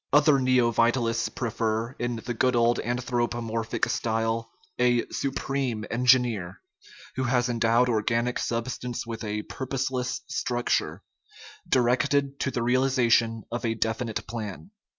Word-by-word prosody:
Other 145 Hz, -1 st, +5 dB
neovitalists 120 Hz, -2 st, +2 dB
prefer, 115 Hz, 0 st, -2 dB
in 120 Hz, 0 st, -1 dB
the 120 Hz, +2 st, -4 dB
good 125 Hz, +2 st, +2 dB
old 120 Hz, 0 st, +3 dB
anthropomorphic 120 Hz, -2 st, -1 dB
style, 115 Hz, 0 st, -1 dB, 0.3 s
a 120 Hz, -1 st, +3 dB
"supreme" 135 Hz, -4 st, -2 dB
engineer, 120 Hz, -7 st, +2 dB, 0.6 s
who 130 Hz, -, 0 dB
has 125 Hz, 0 st, +2 dB
endowed 115 Hz, +1 st, +3 dB
organic 115 Hz, +1 st, 0 dB
substance 120 Hz, +1 st, -3 dB
with 115 Hz, 0 st, -6 dB
a 105 Hz, 0 st, -3 dB
purposive 130 Hz, 0 st, -3 dB, 0.2 s
structure, 120 Hz, -1 st, -1 dB, 0.7 s
directed 140 Hz, +3 st, +2 dB
to -, -, 0 dB
the 120 Hz, -3 st, -2 dB
realization 120 Hz, -3 st, +2 dB
of 120 Hz, 0 st, -3 dB
a 115 Hz, -1 st, 0 dB
definite 110 Hz, 0 st, -2 dB
plan. 110 Hz, -, -6 dB
120 Hz, 115 wpm, -26 LUFS, 115-125 Hz, 0.7 s, Other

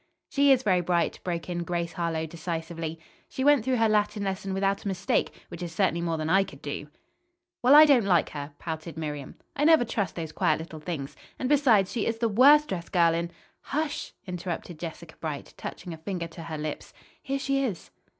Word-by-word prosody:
"She 280 Hz, 0 st, +4 dB
is 260 Hz, -1 st, +4 dB
very 185 Hz, -5 st, +3 dB
bright," 170 Hz, -1 st, 0 dB
broke 170 Hz, -2 st, -3 dB
in 175 Hz, -1 st, -2 dB
Grace 170 Hz, -1 st, -2 dB
Harlowe 165 Hz, -2 st, -1 dB
decisively. 165 Hz, 0 st, -5 dB, 0.3 s
"She 260 Hz, -, -3 dB
went 290 Hz, -4 st, +5 dB
through 260 Hz, +1 st, +1 dB
her 225 Hz, -2 st, +3 dB
Latin 210 Hz, -1 st, +1 dB
lesson 195 Hz, 0 st, -3 dB
without 195 Hz, +1 st, 0 dB
a -, -, -4 dB
mistake, 190 Hz, -1 st, 0 dB, 0.2 s
which 170 Hz, -, -8 dB
is 175 Hz, -1 st, -4 dB
certainly 175 Hz, -3 st, +1 dB
more 165 Hz, -1 st, -1 dB
than 155 Hz, 0 st, -2 dB
I 195 Hz, +4 st, +4 dB
could 140 Hz, -7 st, -12 dB
do." 145 Hz, 0 st, -5 dB, 0.7 s
"Well, 255 Hz, +4 st, +7 dB
I 305 Hz, +1 st, +11 dB
don't 265 Hz, -8 st, +5 dB
like 175 Hz, -4 st, +3 dB
her," 145 Hz, 0 st, -6 dB
pouted 160 Hz, 0 st, -6 dB
Miriam. 150 Hz, -3 st, -5 dB, 0.2 s
"I 285 Hz, -, 0 dB
never 315 Hz, -5 st, +6 dB
trust 200 Hz, -5 st, -2 dB
those 160 Hz, -2 st, -5 dB
quiet -, -, +2 dB
little 160 Hz, -1 st, -8 dB
things. 150 Hz, -4 st, -5 dB, 0.2 s
And, 255 Hz, -, -2 dB
besides, 250 Hz, -9 st, +4 dB
she 230 Hz, -, -1 dB
is 225 Hz, -, -1 dB
the 230 Hz, 0 st, +1 dB
worst 285 Hz, +8 st, +6 dB
dressed 175 Hz, -3 st, -4 dB
girl 170 Hz, -3 st, +4 dB
in 170 Hz, +1 st, -1 dB, 0.2 s
" -, -, -44 dB
"Hush!" 305 Hz, -1 st, -2 dB
interrupted 175 Hz, -2 st, -5 dB
Jessica 165 Hz, -1 st, -7 dB
Bright, 150 Hz, -3 st, -5 dB
touching 175 Hz, -2 st, -7 dB
a -, -, -8 dB
finger 170 Hz, +1 st, -4 dB
to 165 Hz, +1 st, -10 dB
her 160 Hz, -2 st, -5 dB
lips. 150 Hz, 0 st, -5 dB, 0.3 s
"Here 275 Hz, +1 st, -2 dB
she 275 Hz, 0 st, 0 dB
is." 210 Hz, -10 st, -4 dB
180 Hz, 210 wpm, -27 LUFS, 165-225 Hz, 0.7 s, I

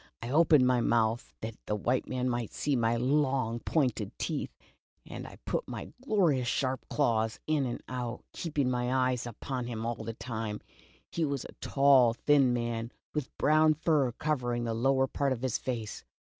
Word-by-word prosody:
I 120 Hz, -, -4 dB
opened 155 Hz, -3 st, +5 dB
my 125 Hz, -1 st, +3 dB
mouth 115 Hz, 0 st, +1 dB
that 110 Hz, 0 st, -5 dB
the 105 Hz, -, 0 dB
white 120 Hz, +5 st, 0 dB
man 130 Hz, 0 st, -1 dB
might 120 Hz, -3 st, -2 dB
see 145 Hz, -2 st, 0 dB
my 115 Hz, -1 st, +2 dB
long 130 Hz, -2 st, +1 dB
pointed 125 Hz, -8 st, -1 dB
teeth, 155 Hz, -4 st, -2 dB, 0.6 s
and -, -, -7 dB
I -, -, -12 dB
put -, -, -2 dB
my -, -, -7 dB
gloriously 175 Hz, -, +2 dB
sharp 130 Hz, +2 st, -1 dB
claws 115 Hz, -6 st, +1 dB
in 150 Hz, -4 st, +1 dB
and 120 Hz, -, -5 dB
out, 125 Hz, -1 st, -4 dB
keeping 150 Hz, -5 st, -1 dB
my 125 Hz, 0 st, 0 dB
eyes 130 Hz, -2 st, +1 dB
upon 125 Hz, +2 st, -4 dB
him 115 Hz, -2 st, -4 dB
all 120 Hz, 0 st, -3 dB
the 115 Hz, -, -5 dB
time. 110 Hz, -3 st, -4 dB, 0.5 s
He 170 Hz, -, -1 dB
was 140 Hz, -4 st, -1 dB
a -, -, -10 dB
tall, 135 Hz, -4 st, +5 dB
thin 140 Hz, -1 st, +4 dB
man, 120 Hz, -1 st, -2 dB, 0.2 s
with 150 Hz, -3 st, -4 dB
brown 155 Hz, +1 st, +4 dB
fur 150 Hz, -5 st, +2 dB
covering 120 Hz, -5 st, -1 dB
the 115 Hz, -1 st, -1 dB
lower 135 Hz, +3 st, +2 dB
part 135 Hz, +1 st, 0 dB
of 125 Hz, 0 st, -7 dB
his 130 Hz, -4 st, 0 dB
face. 115 Hz, -4 st, -4 dB
125 Hz, 175 wpm, -30 LUFS, 115-140 Hz, 0.6 s, opened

